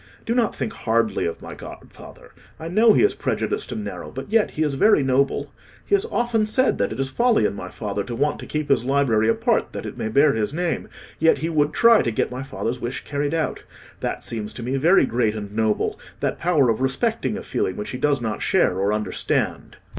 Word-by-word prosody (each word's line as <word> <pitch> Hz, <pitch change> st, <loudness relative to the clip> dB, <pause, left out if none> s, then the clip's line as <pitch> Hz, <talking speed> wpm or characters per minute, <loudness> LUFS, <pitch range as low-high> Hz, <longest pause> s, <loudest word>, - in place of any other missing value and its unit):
Do 230 Hz, -, 0 dB
not 235 Hz, -4 st, +1 dB
think 220 Hz, -, -3 dB
hardly 115 Hz, -4 st, 0 dB
of 85 Hz, -, -6 dB
my -, -, -8 dB
godfather. -, -, -12 dB, 0.3 s
I 160 Hz, +1 st, -6 dB
know 215 Hz, +4 st, +5 dB
he -, -, +4 dB
is 405 Hz, -, +4 dB
prejudiced 420 Hz, 0 st, -2 dB
and 215 Hz, -, -4 dB
narrow, -, -, -6 dB
but -, -, -8 dB
yet 225 Hz, -1 st, +3 dB
he 155 Hz, -, +2 dB
is 150 Hz, -2 st, 0 dB
very 150 Hz, +2 st, +4 dB
noble. 135 Hz, +1 st, +1 dB, 0.3 s
He -, -, -3 dB
has 400 Hz, +2 st, +3 dB
often 230 Hz, -3 st, +1 dB
said 255 Hz, +5 st, +2 dB
that -, -, 0 dB
it -, -, -6 dB
is 135 Hz, 0 st, -1 dB
folly 240 Hz, -, +3 dB
in -, -, 0 dB
my 90 Hz, -2 st, -7 dB
father 100 Hz, -1 st, -4 dB
to 120 Hz, -, -5 dB
want 145 Hz, +5 st, 0 dB
to -, -, -8 dB
keep 150 Hz, -1 st, -3 dB
his 135 Hz, -4 st, +3 dB
library 125 Hz, -5 st, +2 dB
apart, 115 Hz, -, +1 dB
that -, -, -6 dB
it -, -, -7 dB
may -, -, -2 dB
bear 140 Hz, +5 st, +4 dB
his 110 Hz, +6 st, -2 dB
name; 175 Hz, 0 st, -1 dB, 0.3 s
yet 160 Hz, -1 st, +4 dB
he 160 Hz, +4 st, -2 dB
would 150 Hz, -2 st, +1 dB
try 230 Hz, +2 st, +5 dB
to -, -, 0 dB
get 110 Hz, -, -1 dB
my 125 Hz, +1 st, -5 dB
father's 130 Hz, -2 st, -4 dB
wish 120 Hz, +2 st, -4 dB
carried 145 Hz, +2 st, -2 dB
out. 160 Hz, -, -2 dB, 0.4 s
That -, -, -3 dB
seems 110 Hz, -2 st, -5 dB
to 120 Hz, -, -7 dB
me 130 Hz, +3 st, -2 dB
very 170 Hz, +6 st, +5 dB
great 115 Hz, -3 st, 0 dB
and 105 Hz, -1 st, -7 dB
noble—that 110 Hz, -1 st, -2 dB
power 155 Hz, -7 st, +3 dB
of 115 Hz, -, -3 dB
respecting 130 Hz, 0 st, 0 dB
a -, -, -7 dB
feeling 95 Hz, -, -2 dB
which 105 Hz, -, -5 dB
he 125 Hz, -, -5 dB
does 145 Hz, 0 st, +2 dB
not 110 Hz, -2 st, -3 dB
share 90 Hz, -, +2 dB
or 100 Hz, +2 st, +1 dB
understand." 105 Hz, 0 st, -2 dB
140 Hz, 225 wpm, -23 LUFS, 115-175 Hz, 0.4 s, know